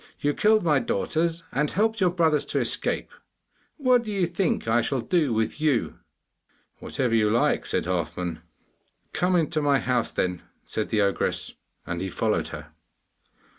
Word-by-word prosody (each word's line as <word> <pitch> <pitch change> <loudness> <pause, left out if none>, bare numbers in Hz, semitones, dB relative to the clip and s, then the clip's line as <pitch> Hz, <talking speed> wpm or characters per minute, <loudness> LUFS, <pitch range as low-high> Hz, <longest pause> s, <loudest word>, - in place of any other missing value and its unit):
You 145 0 +1
killed 215 +3 +3
my 150 -5 +3
daughters 165 - -1
and 150 -1 0
helped 220 +1 0
your 180 - +5
brothers 160 -4 +2
to - - -1
escape. - - -1 0.7
What 255 -4 +4
do 215 - -5
you 195 -3 +1
think 175 - -1
I 115 +2 +3
shall 130 +3 -1
do 150 +2 +1
with 110 +6 -1
you?' 145 -7 0 0.8
'Whatever 125 -3 -2
you 110 -2 +3
like!' 115 +3 +1
said - - -1
Halfman. 90 -2 -3 0.7
'Come 180 +1 +1
into 160 -2 +1
my 145 -1 +3
house, 125 -3 0
then,' 90 -1 -2 0.2
said 110 - -3
the 110 -2 +2
ogress, 100 -1 0 0.3
and - - -4
he - - -3
followed - - 0
her. - - -9
145 Hz, 160 wpm, -25 LUFS, 115-175 Hz, 0.8 s, your